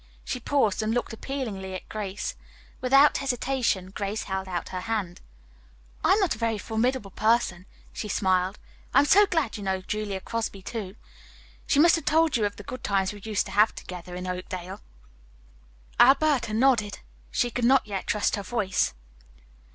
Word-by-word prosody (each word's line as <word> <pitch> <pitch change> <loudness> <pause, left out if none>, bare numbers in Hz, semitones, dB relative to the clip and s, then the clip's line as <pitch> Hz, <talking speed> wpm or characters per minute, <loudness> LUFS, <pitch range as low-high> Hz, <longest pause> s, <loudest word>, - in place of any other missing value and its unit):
She 250 - -3
paused 235 -5 +1
and 220 +2 0
looked 245 -1 -2
appealingly 220 -7 -5
at - - -8
Grace. 210 -1 -4 0.5
Without 275 +3 +5
hesitation 245 -7 -1
Grace 200 +2 -3
held 190 0 -3
out 175 -2 -4
her 185 - -4
hand. 200 -4 -3 0.8
"I - - +5
am 410 - +3
not 385 -4 +2
a 215 - -9
very 230 -2 0
formidable 225 +1 -1
person," 210 -4 +1 0.3
she 215 - -5
smiled. 185 -1 +1 0.4
"I - - +6
am - - +2
so 405 +7 +6
glad 320 -10 0
you 205 - -7
know 190 -1 -1
Julia 205 0 -3
Crosby, 215 -2 -4
too. 205 -4 -5 0.7
She - - +2
must 335 +3 +6
have 330 - -7
told 320 +1 +3
you 220 -3 +2
of 205 - -2
the 205 - -10
good 255 +5 -8
times 195 -1 +1
we 205 - -11
used 215 -2 0
to - - -8
have 210 +2 +4
together 180 0 -8
in 180 0 -5
Oakdale." 185 +1 -5 1.2
Alberta 270 -3 +5
nodded. 230 -4 +2 0.3
She 245 -2 0
could 245 - -3
not 265 +2 +5
yet 200 -3 -5
trust 210 0 +1
her - - -3
voice. 195 - 0
215 Hz, 175 wpm, -26 LUFS, 190-250 Hz, 1.2 s, I